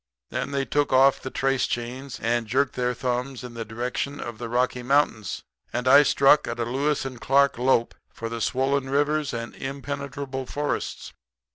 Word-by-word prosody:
Then -, -, -2 dB
they 140 Hz, -1 st, -1 dB
took 145 Hz, +1 st, 0 dB
off 135 Hz, +1 st, +5 dB
the 130 Hz, -, -5 dB
trace 135 Hz, 0 st, +1 dB
chains 125 Hz, +2 st, -5 dB
and 115 Hz, 0 st, +1 dB
jerked 135 Hz, +3 st, +1 dB
their 125 Hz, 0 st, -1 dB
thumbs 125 Hz, +1 st, -2 dB
in 125 Hz, -1 st, -8 dB
the 115 Hz, -1 st, -4 dB
direction 125 Hz, +5 st, -3 dB
of 120 Hz, -2 st, -6 dB
the 120 Hz, -1 st, -5 dB
Rocky 125 Hz, +1 st, 0 dB
Mountains; 125 Hz, -5 st, +1 dB, 0.3 s
and 125 Hz, +1 st, -2 dB
I 140 Hz, +3 st, +9 dB
struck 140 Hz, 0 st, +4 dB
a -, -, -2 dB
Lewis 135 Hz, +5 st, -1 dB
and 130 Hz, -3 st, -7 dB
Clark 140 Hz, -2 st, +3 dB
lope 125 Hz, -2 st, +2 dB, 0.2 s
for 115 Hz, -, -6 dB
the 115 Hz, 0 st, -5 dB
swollen 135 Hz, +3 st, 0 dB
rivers 145 Hz, +2 st, +1 dB
and 115 Hz, 0 st, -5 dB
impenetrable 140 Hz, -1 st, -5 dB
forests. 145 Hz, 0 st, -3 dB
130 Hz, 170 wpm, -25 LUFS, 120-140 Hz, 0.3 s, I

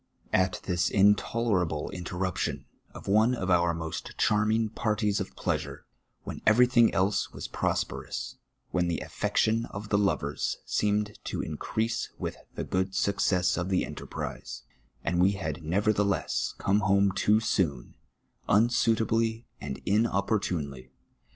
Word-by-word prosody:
At 95 Hz, -1 st, +2 dB
this 90 Hz, -1 st, +1 dB
intolerable 100 Hz, -5 st, +2 dB
interruption 90 Hz, +1 st, -3 dB, 0.3 s
of -, -, -11 dB
one 110 Hz, +5 st, +4 dB
of 95 Hz, -5 st, -2 dB
our 85 Hz, -1 st, +4 dB
most 80 Hz, -1 st, -5 dB
charming 110 Hz, +1 st, +2 dB
parties 105 Hz, -1 st, 0 dB
of -, -, -5 dB
pleasure, -, -, -3 dB, 0.4 s
when -, -, -6 dB
everj'thing 120 Hz, +1 st, +5 dB
else 95 Hz, +2 st, +1 dB
was -, -, -6 dB
prosperous, -, -, -3 dB, 0.3 s
when 90 Hz, -1 st, +1 dB
the 85 Hz, -, -1 dB
affection 115 Hz, +1 st, 0 dB
of 105 Hz, +1 st, -7 dB
the 100 Hz, -, +3 dB
lovers 75 Hz, -8 st, 0 dB
seemed 105 Hz, 0 st, 0 dB
to -, -, -3 dB
increase 110 Hz, +1 st, -2 dB
with -, -, -4 dB, 0.2 s
the -, -, -3 dB
good 95 Hz, +1 st, -1 dB
success 90 Hz, -3 st, +2 dB
of 85 Hz, +2 st, -2 dB
the 95 Hz, -, +1 dB
enterprise, -, -, -6 dB, 0.4 s
a]id 85 Hz, +1 st, +1 dB
we 95 Hz, +3 st, +4 dB
had 95 Hz, -1 st, -3 dB
neverthe 100 Hz, +6 st, +1 dB
less 100 Hz, -1 st, -1 dB
come 100 Hz, +1 st, +2 dB
home 100 Hz, -1 st, +3 dB
too 105 Hz, +2 st, +3 dB
soon, 85 Hz, -, -1 dB, 0.6 s
unsuitably 115 Hz, 0 st, +2 dB, 0.2 s
and 65 Hz, -, -5 dB
inopportunely. 95 Hz, -, 0 dB
100 Hz, 130 wpm, -28 LUFS, 90-110 Hz, 0.6 s, everj'thing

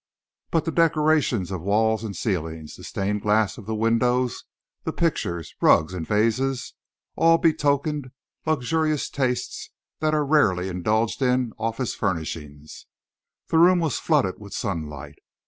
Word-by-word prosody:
But 165 Hz, -2 st, 0 dB
the 165 Hz, -, -1 dB
decorations 155 Hz, -, +2 dB
of 95 Hz, -3 st, -4 dB
walls 110 Hz, +3 st, +1 dB
and 105 Hz, -3 st, -5 dB
ceilings, 80 Hz, -6 st, -3 dB
the -, -, -13 dB
stained 100 Hz, +1 st, -2 dB
glass 105 Hz, +1 st, +1 dB
of 105 Hz, -, -12 dB
the 110 Hz, -, -2 dB
windows, 120 Hz, +3 st, +1 dB, 0.4 s
the -, -, -2 dB
pictures, 85 Hz, -, -2 dB
rugs, 80 Hz, +4 st, +4 dB
and 85 Hz, -3 st, -5 dB
vases, 115 Hz, +5 st, 0 dB, 0.4 s
all 165 Hz, 0 st, +5 dB
betokened 150 Hz, -3 st, +1 dB, 0.4 s
luxurious 155 Hz, +1 st, 0 dB
tastes 130 Hz, -3 st, -2 dB, 0.3 s
that 155 Hz, 0 st, +1 dB
are 150 Hz, -1 st, +1 dB
rarely 95 Hz, -11 st, +2 dB
indulged 110 Hz, +8 st, 0 dB
in 125 Hz, -2 st, +1 dB
office 115 Hz, +2 st, -2 dB
furnishings. 75 Hz, -4 st, -5 dB, 0.6 s
The 160 Hz, -, +3 dB
room 180 Hz, +2 st, +6 dB
was 165 Hz, -4 st, 0 dB
flooded 140 Hz, -, +1 dB
with 100 Hz, -1 st, -9 dB
sunlight. 75 Hz, -5 st, -5 dB
115 Hz, 135 wpm, -24 LUFS, 95-150 Hz, 0.6 s, room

